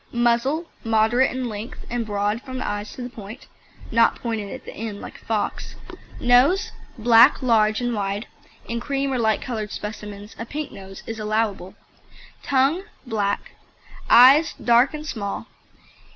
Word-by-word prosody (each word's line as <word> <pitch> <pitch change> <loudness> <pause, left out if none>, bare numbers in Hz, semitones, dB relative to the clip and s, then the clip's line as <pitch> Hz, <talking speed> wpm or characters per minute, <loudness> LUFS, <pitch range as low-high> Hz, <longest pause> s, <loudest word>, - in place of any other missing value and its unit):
MUZZLE 240 +7 +1 0.2
Moderate 225 +3 +3
in 255 -1 -3
length, 220 +3 -7
and 240 0 -2
broad 205 +2 -1
from 260 -1 -7
the - - -3
eyes 205 0 -4
to 255 - -7
the 245 - -5
point 220 0 -10 0.5
(not 230 0 +4
pointed 220 -4 -4
at - - -8
the - - -8
end 215 -2 -6
like - - -10
a - - -24
fox). 220 -2 -2 0.4
NOSE 255 +10 +4 0.3
Black, 230 +2 +6
large 220 -2 +3
and 245 -1 -1
wide. 205 +1 -2 0.4
(In 235 0 -2
cream 275 +2 -1
or 255 - 0
light 220 -2 +1
coloured 220 -4 -4
specimens, 210 0 -7
a 230 - -4
pink 300 +3 -5
nose 195 0 -11
is 225 0 -6
allowable.) 215 -3 -2 0.7
TONGUE 280 +8 +1 0.2
Black. 205 -4 -2 0.6
EYES 270 +7 +7
Dark 240 +5 +3
and 305 0 -7
small. 205 -9 -4
230 Hz, 155 wpm, -23 LUFS, 210-255 Hz, 0.7 s, EYES